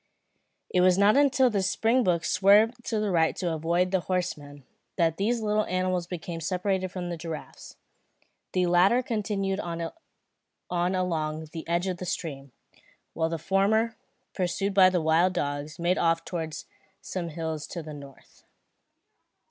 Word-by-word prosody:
It 180 - +3
was 180 0 +5
not 200 +3 +5
until 270 -3 +4
the 200 -2 +1
springboks 195 -3 +1
swerved 210 +6 +4
to 220 - -1
the 210 -2 0
right 165 -2 +2
to 175 -3 -2
avoid 170 +3 0
the 190 - +2
horsemen, 150 -6 -4 0.3
that 165 -2 +1
these 225 +4 0
little 215 0 +1
animals 185 -1 -1
became 170 -1 -6
separated 185 +2 -1
from 180 -1 -5
the 170 - -4
giraffes. 160 -1 -8 0.8
The 185 -1 +2
latter 180 +8 +4
continued 205 -4 -2
on 170 -2 -4 0.8
along 175 -4 -1
the 160 -1 -7
edge 170 +2 0
of 185 -2 -2
the 180 - -6
stream, 140 -6 -5 0.6
while 160 0 0
the 165 - -2
former, 210 +6 +1 0.4
pursued 190 +2 -1
by 190 -1 +7
the 180 -2 0
wild 165 +4 +3
dogs, 145 -2 -3
made 175 +2 +1
off 165 0 +1
towards 160 -3 -5 0.4
some 175 -3 -4
hills 160 -2 -4
to 170 - -6
the 155 0 -8
north. 140 -2 -14
180 Hz, 150 wpm, -27 LUFS, 165-195 Hz, 0.8 s, by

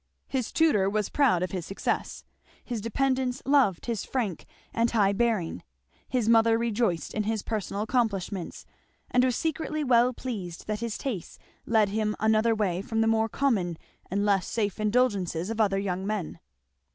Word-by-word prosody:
His 255 -4 -2
tutor 250 -13 +3
was 210 0 -1
proud 245 -12 +3
of 185 - -3
his 185 -3 -3
success; 195 - -3 0.4
his 235 -3 -3
dependants 255 +2 0
loved 270 -11 +3
his 230 -5 -2
frank 220 -10 -3 0.3
and 230 +1 +2
high 205 -4 +3
bearing; 215 -6 0 0.5
his 245 -4 0
mother 225 0 +5
rejoiced 230 -6 0
in 215 - 0
his 220 -1 -1
personal 210 -2 -2
accomplishments, 205 -6 -2 0.5
and 250 - +4
was 255 -2 +2
secretly 310 0 -2
well 250 -2 +4
pleased 205 -9 -6
that 210 0 -2
his 235 -1 -3
tastes 230 - -5 0.3
led 220 -3 +3
him 210 +1 -1
another 220 +1 +3
way 190 -4 0
from 225 +2 -1
the - - +3
more 225 0 +2
common 200 -11 0 0.3
and 200 +2 0
less 195 -3 +2
safe 210 -3 -1
indulgences 205 -5 +1
of 225 0 0
other 195 -2 +2
young 190 -1 -2
men. 205 -6 -3
220 Hz, 165 wpm, -27 LUFS, 195-240 Hz, 0.5 s, mother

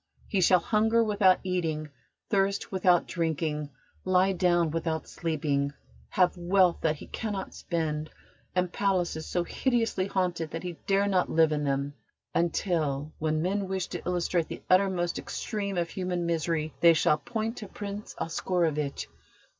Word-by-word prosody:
He 195 - +1
shall 185 +1 +6
hunger 225 +4 +2
without 205 -4 +4
eating, 160 -5 -2 0.4
thirst 200 -1 0
without 180 -2 +3
drinking, 155 -3 -2 0.3
lie 185 +1 +3
down 175 -3 +2
without 160 -1 -2
sleeping, 145 -4 -1 0.4
have 180 -1 +3
wealth 180 0 +3
that 155 -1 +2
he - - -10
cannot 205 -4 -4
spend, 155 -2 -2 0.5
and 180 -1 0
palaces 180 -5 0
so 175 - 0
hideously 225 -3 0
haunted 180 -4 -1
that 165 +2 -5
he 175 -1 -4
dare 200 +1 +3
not 185 -2 +2
live 160 -1 +4
in 150 -1 0
them, 140 +1 -1 0.4
until, 155 -4 0
when 155 0 0
men 195 +2 0
wish 190 -1 -1
to - - -5
illustrate 175 -1 0
the - - -8
uttermost 185 -2 +2
extreme 200 -4 -4
of 170 -1 -1
human 180 -2 -2
misery, 165 -2 -1
they 170 -1 +7
shall 150 -1 +3
point 225 -1 -3
to 210 - -7
Prince 205 -1 -7
Oscarovitch. 165 -4 -1
175 Hz, 145 wpm, -28 LUFS, 160-195 Hz, 0.5 s, they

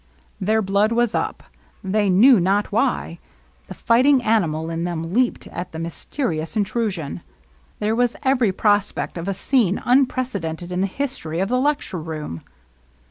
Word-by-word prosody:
Their 215 +3 +1
blood 200 +3 +2
was 235 -1 +1
up, - - -2 0.2
— - - -34
they 210 -2 +2
knew 225 +6 +6
not 195 +4 +1
why; 220 -6 0 0.5
the - - -9
fighting 255 +3 +3
animal 165 -8 +1
in 165 0 -3
them 170 -1 -4
leaped 250 +2 +1
at 175 -1 -7
the - - -6
mysterious 165 - -4
intrusion. 200 - -2 0.6
There 215 +1 0
was 245 0 +1
every 255 -6 +3
prospect 205 +1 0
of 170 +1 -5
a 195 - -1
scene 210 -2 +1
unprecedented 245 -10 0
in 180 +1 -1
the 195 - +1
history 195 - -3
of 195 +2 0
the 250 +1 +1
lecture 280 - -1
room. 155 - -6
205 Hz, 155 wpm, -22 LUFS, 170-240 Hz, 0.6 s, knew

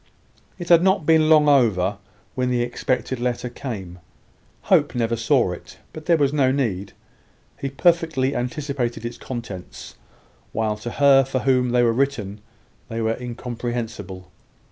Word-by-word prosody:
It 175 -2 -7
had 170 -1 +7
not 190 -3 +2
been 160 -1 +4
long 155 -2 +6
over 105 -8 +3 0.3
when 125 -1 -1
the 120 -1 +1
expected 125 +1 -2
letter 125 0 -2
came. 100 -10 -7 0.6
Hope - - +2
never 115 -1 0
saw 110 -1 +2
it; - - -10 0.2
but 155 -1 -10
there 170 -2 +4
was 145 -2 +1
no 135 -3 +3
need: 100 -8 -2 0.7
he 140 - -3
perfectly 160 -2 +1
anticipated 125 -2 -3
its 120 0 -6
contents, 115 -8 -8 0.6
while 110 -1 0
to 110 +3 -6
her 140 -1 +5
for 130 -1 -2
whom 125 -2 +2
they 120 0 +3
were 115 -1 +3
written 115 -6 -2 0.5
they 115 0 -4
were 110 0 0
incomprehensible. 120 -6 -5
125 Hz, 145 wpm, -22 LUFS, 115-140 Hz, 0.7 s, had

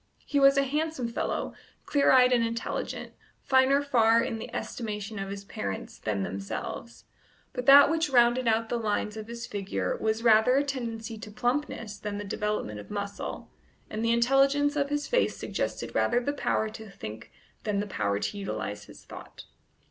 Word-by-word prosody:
He 285 - +1
was 275 0 +6
a 275 - +5
handsome 295 -2 -1
fellow, 235 - -2 0.3
clear 285 -1 +3
eyed 255 -1 +6
and 240 -2 +3
intelligent, 230 0 -3 0.3
finer 265 +2 +4
far, 230 -4 +4
in 225 - -3
the - - -7
estimation 210 -2 -5
of 195 0 -4
his 200 0 -6
parents, 100 - -5
than 100 -3 -2
themselves; 95 +1 -6 0.5
but 250 - -5
that 280 +1 +10
which 320 0 +1
rounded 240 -1 +4
out 225 0 +2
the 240 - -1
lines 210 -1 -1
of 215 0 -7
his 235 0 -6
figure 200 -1 -2
was 220 +1 -1
rather 225 +2 +5
a 280 - +3
tendency 230 -5 -4
to 215 - -8
plumpness 240 -2 -2
than 205 -1 -4
the 205 - -4
development 205 - -3
of 105 - -11
muscle, 200 -1 -5 0.4
and 215 +1 -3
the 230 - +2
intelligence 275 +4 +3
of 280 -1 0
his 290 0 -1
face - - +1
suggested - - -3
rather 240 - +2
the 285 +4 -2
power 220 -5 0
to 220 0 -9
think 110 - -9 0.3
than 210 -2 0
the 205 - -1
power 100 - -1
to 205 - -3
utilize 110 - -4
his - - -15
thought. - - -11
230 Hz, 180 wpm, -28 LUFS, 205-265 Hz, 0.5 s, that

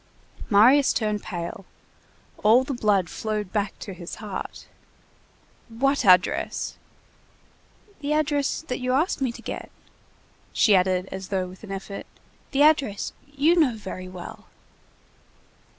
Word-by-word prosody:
Marius 250 +7 +6
turned 210 -2 -1
pale. 175 +2 -5 0.8
All 225 +5 +6
the 275 - -4
blood 205 -6 +2
flowed 210 -1 -4
back 205 -2 -1
to 195 - -7
his 175 -1 -8
heart. 210 -3 -7 1.0
"What 275 +5 +1
address?" 180 -2 +3 1.2
"The 295 0 -1
address 295 -1 0
that 250 -6 -4
you 255 0 0
asked 305 +3 +1
me 260 -3 +1
to - - -12
get!" - - -6 0.8
She 210 - +5
added, 185 0 +2
as 190 0 -6
though 190 -2 -1
with 185 +3 -13
an 205 - -8
effort:— 195 +1 -6 0.4
"The 280 +1 +3
address—you 285 - +2
know 280 -8 +4
very 185 -3 -7
well!" 180 -1 -10
215 Hz, 125 wpm, -25 LUFS, 190-275 Hz, 1.2 s, Marius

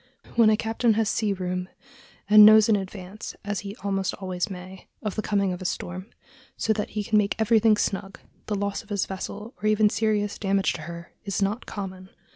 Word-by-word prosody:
When 230 -2 +6
a 215 - +3
captain 225 0 +1
has 220 -1 +1
sea 215 -2 0
room, 180 -1 -3 0.6
and 210 0 +9
knows 215 0 +8
in 220 - +4
advance, 195 +1 -6
as 205 -1 -2
he 200 0 -7
almost 195 -1 -1
always 185 +1 -3
may, 185 0 -9 0.2
of 210 -3 -2
the 215 - -2
coming 200 -3 0
of 180 - -7
a - - -6
storm, 185 +2 -4 0.5
so 220 - +1
that 210 -1 -3
he 210 - 0
can 215 +1 +3
make 200 -1 0
everything 220 -1 +4
snug, 195 -1 -2 0.3
the 210 - -1
loss 200 0 -2
of 215 - -22
his 200 -2 0
vessel, 205 +4 -6
or 215 - 0
even 215 0 +4
serious 210 -2 0
damage 195 -1 +1
to 155 - -7
her, 170 0 -9
is 200 - -2
not 205 +4 -1
common. 190 -2 -7
205 Hz, 205 wpm, -25 LUFS, 190-215 Hz, 0.6 s, and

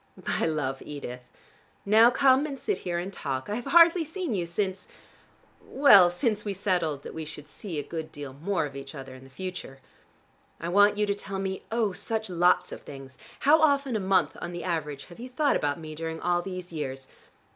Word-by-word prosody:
But - - -2
I - - +2
love 140 -4 -2
Edith. 125 -4 -7 0.6
Now 220 +3 +7
come 265 +2 +4
and 275 -2 -6
sit 420 - -2
here 175 -1 -3
and 185 +3 -4
talk. 135 -2 -4
I - - 0
have 245 - -6
hardly 335 0 +6
seen 320 - -4
you, 175 -4 -1
since 190 +2 -3 0.8
well, 205 -11 +7
since 210 +4 -1
we 205 -2 -3
settled 175 -7 -1
that - - -8
we 160 - -5
should 150 -1 -10
see 175 0 -7
a 145 - -2
good 160 -2 -6
deal 145 -2 -8
more 165 +4 -1
of 140 -2 -8
each 135 +1 -8
other 135 -2 -8
in 130 0 -13
the 135 - -15
future. 180 -3 -7 0.8
I 170 - -4
want 205 +3 +5
you 210 - +2
to 200 - 0
tell 195 -1 -6
me, 190 0 -3
oh, 225 -4 +1
such 220 0 -3
lots 175 +1 +3
of - - -8
things. 135 -1 -11 0.3
How 310 +3 +5
often 280 -5 +3
a - - +1
month 185 -5 +2
on 175 - -5
the 175 - -5
average 150 -5 -3
have 175 - -14
you 250 +2 -7
thought 285 +3 +1
about 145 +2 -1
me 155 -1 -8
during 160 +1 -5
all 175 0 +1
these 185 -1 -7
years? 135 -4 -5
180 Hz, 210 wpm, -27 LUFS, 150-215 Hz, 0.8 s, Now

